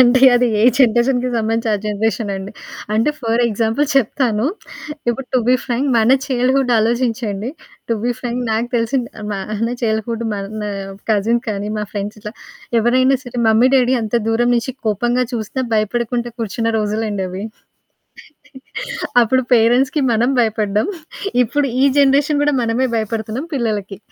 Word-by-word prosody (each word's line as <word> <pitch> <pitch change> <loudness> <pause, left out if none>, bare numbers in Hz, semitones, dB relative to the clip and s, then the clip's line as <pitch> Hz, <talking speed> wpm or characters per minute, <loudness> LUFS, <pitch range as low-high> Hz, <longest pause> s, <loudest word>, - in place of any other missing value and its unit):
అంటే 250 0 +5
అది 245 0 +3
ఏ - - +2 0.2
జనరేషన్‌కి 245 +1 +3
సంబంధించి 225 +1 -1
ఆ! - - +3
జనరేషన్ 215 0 -1
అండి. 195 +1 -7 0.4
అంటే 225 +7 +2
ఫర్ 230 -1 0
ఎగ్జాంపుల్ 225 +6 0
చెప్తాను. 240 -2 +1 0.6
ఇప్పుడు 255 +2 -2
టు 255 - +5
బి 255 - +6
ఫ్రాంక్ 250 +3 -1
మన 235 +4 +5
చైల్డ్‌హూడ్ 260 0 +1
ఆలోచించండి. 225 -1 -1 0.4
టు - - +3
బి 245 - +1
ఫ్రాంక్ 245 0 -3
నాకు 225 +2 0
తెలిసిన 240 +3 0 0.3
మన 210 +3 -3
చైల్డ్‌హూడ్ 225 +1 -1
మన 205 +1 -5 0.5
కజిన్ 220 +3 +2
కానీ, 205 0 -3
మా 210 - -2
ఫ్రెండ్స్ 205 +1 -4
ఇట్లా 210 0 -7 0.5
ఎవరైనా 255 +3 +3
సరే 245 0 -6
మమ్మీ 225 +4 +5
డాడీ 255 0 +3
అంత 220 +1 -4
దూరం 240 +2 +2
నుంచి 245 +2 -2
కోపంగా 240 +4 +1
చూసి 235 +3 -3
భయపడుకుంటూ 235 +3 -1
కూర్చున్న 225 +1 -2
రోజులండవి. 205 -3 -2 1.8
అప్పుడు 255 +3 +2
పేరెంట్స్‌కి 245 +6 +3
మనం 230 +2 +2
భయపడ్డం, 215 - 0 0.6
ఇప్పుడు 280 +4 0 0.2
ఈ - - +6
జనరేషన్ 285 +1 +3
కూడా 295 0 +2
మనమే 235 +3 +1
భయపడుతున్నాం 220 +5 -3
పిల్లలకి. 210 -6 -2
230 Hz, 135 wpm, -18 LUFS, 215-250 Hz, 1.8 s, బి